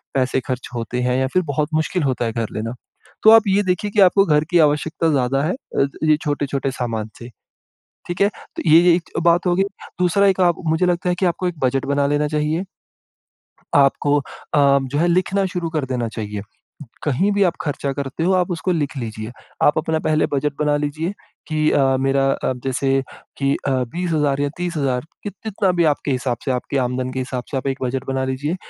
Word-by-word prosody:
पैसे 130 0 +1
खर्च 130 -2 -4
होते 120 +1 -3
हैं 125 0 +1
या 130 - +1
फिर 185 - +3
बहुत 150 +2 0
मुश्किल 160 +2 0
होता 130 -3 0
है 115 - -1
घर 115 -1 -2
लेना, 115 +2 -3 0.5
तो 220 - +8
आप 225 0 +9
ये 200 +1 +3
देखिए 185 +2 -1
कि 210 - 0
आपको 195 +1 +5
घर 150 -4 +3
की 175 - +4
आवश्यकता 155 +2 +2
ज़्यादा 135 0 +1
है 165 +5 0
अ, 250 - -1 0.2
ये 155 -1 +4
छोटे-छोटे 140 -2 -1
सामान 115 -4 -3
से, 120 - -9 0.8
ठीक 175 - -4
है? 200 - +5 0.3
तो - - -3
ये 160 +2 +8
ये 175 -1 +5
एक 175 - -6
बात 170 +2 +3
होगी। 180 +2 +3 0.4
दूसरा 180 +3 +3
एक 190 -1 +1
आप 175 -2 +3
मुझे 160 +3 +2
लगता 180 0 0
है - - +2
कि 185 - +2
आपको 180 +1 0
एक 170 -3 -6
बजट 130 0 +1
बना 140 0 +1
लेना 145 +1 +1
चाहिए, 155 +4 -1 1.1
आपको 145 +1 +3
अ, - - -2 0.6
जो 135 +2 -3
है 170 - +3
लिखना 185 +3 +1
शुरू 170 -2 -3
कर 150 - 0
देना 120 -2 -1
चाहिए। 105 -2 -5 0.6
कहीं 155 +8 +1
भी 200 0 +2
आप 175 - +1
खर्चा 140 -2 -2
करते 140 +2 -4
हो, 185 - +3
आप 180 0 +1
उसको 175 +2 -1
लिख 150 -4 -2
लीजिए। 110 -2 -5 0.3
आप 150 - +4
अपना 160 0 0
पहले 155 0 +1
बजट 145 +1 0
बना 150 -1 +2
लीजिए 155 +5 -2 0.4
कि 155 -1 +1
अ, 135 -1 +3
मेरा 135 0 +2 0.3
अब 125 -1 -5
जैसे 135 0 +1 0.4
कि 140 0 +1
अ, - - +2 0.2
20,000 155 -6 0
या 145 - +1
30,000 145 -8 -1 0.2
कि 205 - -3
कितना 205 -2 -2
भी 175 -1 +2
आपके 145 - -4
हिसाब 125 -2 -1
से, - - 0
आपके 125 +2 -2
आमदन 125 0 -1
के 130 - -4
हिसाब 130 -1 -4
से, 140 - -3
आप 130 - -6
एक 135 0 -2
बजट 130 +1 -2
बना 135 0 0
लीजिए 135 +6 -2
145 Hz, 210 wpm, -20 LUFS, 130-175 Hz, 1.1 s, आप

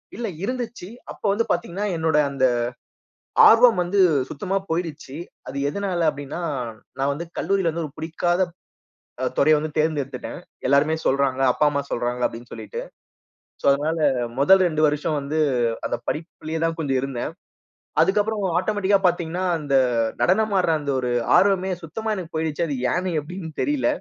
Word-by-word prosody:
இல்ல. 235 0 -3 0.2
இருந்துச்சி, 240 -5 -4 0.2
அப்ப - - -13
வந்து 225 +3 +1
பாத்தீங்கன்னா, 175 +4 -2
என்னோட 160 -1 +1
அந்த 135 -1 +1 1.0
ஆர்வம் 230 -4 +6
வந்து 190 +3 -1 0.3
சுத்தமா 190 +6 -3
போயிருச்சி. 160 -4 -3 0.3
அது 140 - -5
எதனால 180 -1 -1
அப்பிடின்னா, 145 +3 -7 0.6
நான் 135 +1 +1
வந்து 165 +4 -4
கல்லூரில 195 -4 +1
வந்து 165 0 -3
ஒரு 140 - -13
புடிக்காத 175 +3 -1 0.8
அ - - +1
துறைய 155 - +6
வந்து 155 +1 -3
தேர்ந்தெடுத்துட்டேன். 145 -4 -2 0.3
எல்லாருமே 140 +4 +3
சொல்றாங்க. 135 -1 +1
அப்பா, 150 - +1
அம்மா 140 -1 -1
சொல்றாங்க 120 +1 -2
அப்பிடின்னு 120 +1 -8
சொல்லிட்டு. 475 +1 -6 0.8
சோ, - - -20
அதனால 155 +4 -1 0.4
முதல் 190 +7 +6
2 155 -2 -1
வருஷம் 150 +1 0
வந்து 145 +3 -3 0.5
அந்த - - -1
படிப்பிலே 160 0 -4
தான் 165 0 0
கொஞ்சம் 135 -4 0
இருந்தேன். 135 +1 -3 0.7
அதுக்கப்புறம் 210 +1 +1 0.2
ஆட்டோமேட்டிக்கா 205 -1 +2
பார்த்தீங்கன்னா, 175 +1 -1
அந்த 145 -2 -1 0.5
நடனமாடுற 190 -3 +3
அந்த 140 -1 -2
ஒரு 125 -1 -1 0.3
ஆர்வமே 190 -1 +3
சுத்தமா 220 +7 -3
எனக்கு 175 -4 -7
போயிருச்சி, 160 +1 -1
அது 140 -4 -2 0.2
ஏன்னு 180 -2 -1
எப்பிடின்னு 165 +1 -8
தெரியல. 295 0 +1
165 Hz, 140 wpm, -23 LUFS, 145-190 Hz, 1.0 s, ஆர்வம்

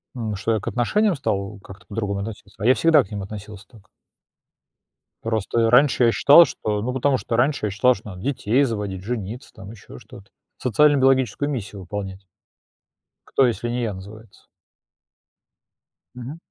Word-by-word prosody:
Ну 110 -4 -3
что 115 +3 -1
я 110 - 0
к - - -10
отношениям 200 - +1
стал 105 -6 -3
как-то 95 0 -14
по-другому 100 -2 -3
относиться. 100 -1 -9
А - - -2
я 125 - +6
всегда 165 +1 +4
к 95 - -17
ним 100 -1 -4
относился 105 +1 -10
так. 110 -6 -20 1.4
Просто 115 0 -1
я 115 - +3
раньше 125 0 +4
я 115 - +4
считал, 145 +8 +7
что 105 -7 -3
ну, 125 +4 -3
потому 130 +1 +1
что 115 - -3
раньше 125 -1 +1
я - - -2
считал, 115 +6 +3
что 105 +2 -11
надо 90 -2 -9
детей 130 0 +1
заводить, 105 -7 -3
жениться 115 +2 -5
там, 95 +2 -11
ещё 105 - -13
что-то, 100 0 -15 0.3
социально-биологическую 135 +1 +2
миссию 105 -7 -5
выполнять. 95 +1 -7 1.0
Кто, 135 - +3
если 120 -1 -1
не 120 +1 -2
я 110 -3 -2
называется? 100 +3 -13 1.7
Мгм. 125 +5 -8
110 Hz, 165 wpm, -22 LUFS, 100-125 Hz, 1.7 s, считал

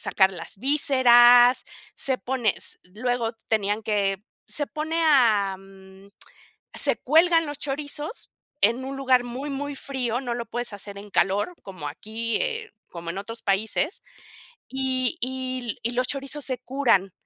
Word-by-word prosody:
sacar 190 -1 +3
las 175 +2 -7
vísceras, 245 -2 +6 0.3
se 260 -2 0
pone, 245 -5 0
s - - -4 0.2
luego 240 0 -1 0.2
tenían 210 0 0
que, 200 -2 0 0.2
se 290 - -1
pone 320 +2 -2
a 220 -10 +4
mm, 195 0 -16 0.7
se - - +1
cuelgan 330 +3 +4
los 290 -1 -5
chorizos, 295 - -4 0.3
en 235 +5 +3
un 270 +1 -5
lugar 260 -2 +3
muy, 260 +4 -5
muy 285 +1 -4
frío, 255 -4 -2
no 245 -3 -3
lo 235 -1 -4
puedes 240 +1 -3
hacer 200 0 -9
en 205 +1 -11
calor, 205 - +1
como 185 -7 -7
aquí, 220 +9 -3
eh, 460 -3 -2 0.2
como 170 -1 -6
en 190 - -5
otros 225 +3 -7
países, 220 - 0 0.7
y 265 +3 -1
y 255 0 -2
l 225 - -4
y 235 - 0
los 255 +1 0
chorizos 275 +1 -3
se 255 -2 -2
curan. 240 -8 +1
245 Hz, 155 wpm, -25 LUFS, 205-275 Hz, 0.7 s, vísceras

